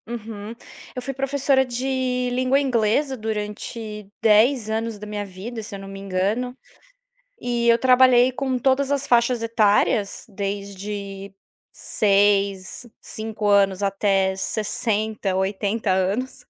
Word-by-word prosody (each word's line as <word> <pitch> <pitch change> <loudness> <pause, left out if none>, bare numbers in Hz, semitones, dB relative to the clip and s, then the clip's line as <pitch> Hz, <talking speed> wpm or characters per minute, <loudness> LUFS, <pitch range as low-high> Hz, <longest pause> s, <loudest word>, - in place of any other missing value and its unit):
Uhum. 225 -1 -7 0.4
Eu 250 - -4
fui 270 +2 -4
professora 275 0 +1
de 255 0 -1
língua 255 +2 +2
inglesa 265 +1 +1
durante 210 -1 -5
10 225 +2 +4
anos 225 0 -2
da 210 - -9
minha 210 -1 -4
vida, 205 +5 -7
se 210 -1 -8
eu - - -7
não 195 - -9
me 195 0 -8
engano. 200 +7 -2 0.8
E 240 -1 0
eu 235 0 +6
trabalhei 255 0 +5
com 260 0 -2
todas 270 +2 +1
as 280 -1 0
faixas 240 0 +2
etárias, 210 -2 +2
desde 200 -1 -5 0.4
6, 200 0 +1
5 220 -1 -5
anos 200 -1 +3
até 195 -1 +1
60, 215 0 -1
80 200 +3 -1
anos. 215 +8 -1
220 Hz, 125 wpm, -23 LUFS, 200-250 Hz, 0.8 s, eu